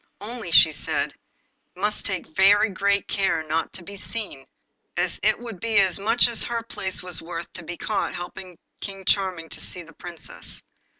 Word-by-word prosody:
Only, 225 -2 -6
she 165 -1 +8
said, 150 - -1 0.6
he - - -15
must 210 +2 0
take 185 -5 -4
very 205 +2 +6
great 200 +1 +2
care 190 -5 +1
not 155 +1 -1
to 180 - -5
be 200 +3 -8
seen, 200 -9 -3 0.5
as - - 0
it - - +4
would 230 -6 -7
be 225 +2 +1
as 190 -2 +4
much 225 +5 +5
as 235 -2 0
her 235 -1 -2
place 190 -5 -3
was 180 -2 +1
worth 165 0 -6
to 175 - -8
be 175 +1 -6
caught 210 -2 -1
helping 175 0 -7 0.2
King 195 -1 -7
Charming 185 -5 +1
to - - -5
see 180 - -3
the 165 0 -15
Princess. 170 -1 -7
190 Hz, 185 wpm, -25 LUFS, 170-205 Hz, 0.6 s, she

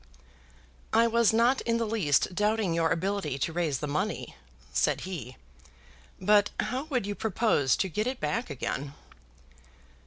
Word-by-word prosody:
"I 230 +1 +5
was 235 -1 +3
not 235 +4 +3
in 230 0 0
the 230 - 0
least 190 -7 +1
doubting 210 -2 +1
your 165 -1 +2
ability 165 -3 -1
to 160 +4 -2
raise 165 -5 0
the 150 - -4
money," 145 +1 -3 0.4
said - - +1
he; 145 -10 -6 0.8
"but 205 +2 +4
how 260 +3 -1
would 255 -9 -1
you 205 - -2
propose 205 - +1
to 190 - 0
get 210 +6 -2
it 255 0 -3
back 230 -4 -2
again?" 140 0 -4
200 Hz, 150 wpm, -28 LUFS, 160-230 Hz, 0.8 s, I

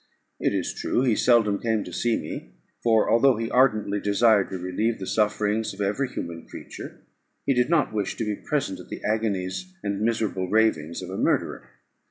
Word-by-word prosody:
It - - +1
is - - -1
true, 125 - 0
he 125 -4 +3
seldom 110 -5 +3
came 110 -3 0
to 90 - -9
see 120 +5 +1
me; - - -7 0.3
for, 115 -2 +3
although 120 +2 +4
he 115 0 -3
ardently 110 -5 +3
desired 105 0 +3
to 95 - -4
relieve 90 +6 -1
the 95 - -6
sufferings 105 +1 0
of - - -17
every 105 +7 0
human 85 -7 -6
creature, - - -10 0.4
he 140 - +3
did 125 +1 +2
not 165 -8 +2
wish 105 -2 -2
to 115 - -3
be 105 - -1
present 135 -6 -2
at - - -12
the - - -7
agonies 110 - -2
and 100 0 -2
miserable 110 -5 0
ravings 90 -7 +1
of 90 - -7
a 95 - -4
murderer. - - 0
110 Hz, 190 wpm, -25 LUFS, 100-115 Hz, 0.4 s, although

